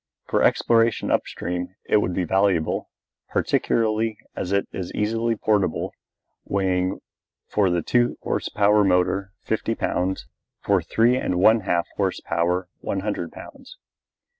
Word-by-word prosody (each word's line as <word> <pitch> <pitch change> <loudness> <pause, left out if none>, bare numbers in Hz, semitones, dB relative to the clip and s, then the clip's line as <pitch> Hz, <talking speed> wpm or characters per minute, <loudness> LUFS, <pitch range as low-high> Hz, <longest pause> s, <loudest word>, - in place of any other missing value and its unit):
For - - 0
exploration 115 0 +3
up - - +1
stream 90 +1 -4
it - - +4
would 90 -4 0
be 95 - 0
valuable, 95 -2 +1 0.4
particularly 110 -1 +1 0.2
as 90 - -3
it 100 0 +1
is 90 -2 -5
easily 115 +2 0
portable, 105 -6 0 0.5
weighing 95 -1 0 0.5
for 100 -3 +2
the 85 -2 0
two 120 0 +2
horse - - -2
power 105 0 +4
motor 95 +1 +1
fifty - - -1
pounds, 95 +1 -1 0.4
for 100 -2 +3
three 115 +9 +2
and 90 - -1
one 110 +5 +5
half 85 -4 0
horse - - 0
power 90 +2 -1
one 95 - -3
hundred 100 -5 -3
pounds. - - -12
100 Hz, 140 wpm, -23 LUFS, 90-110 Hz, 0.5 s, one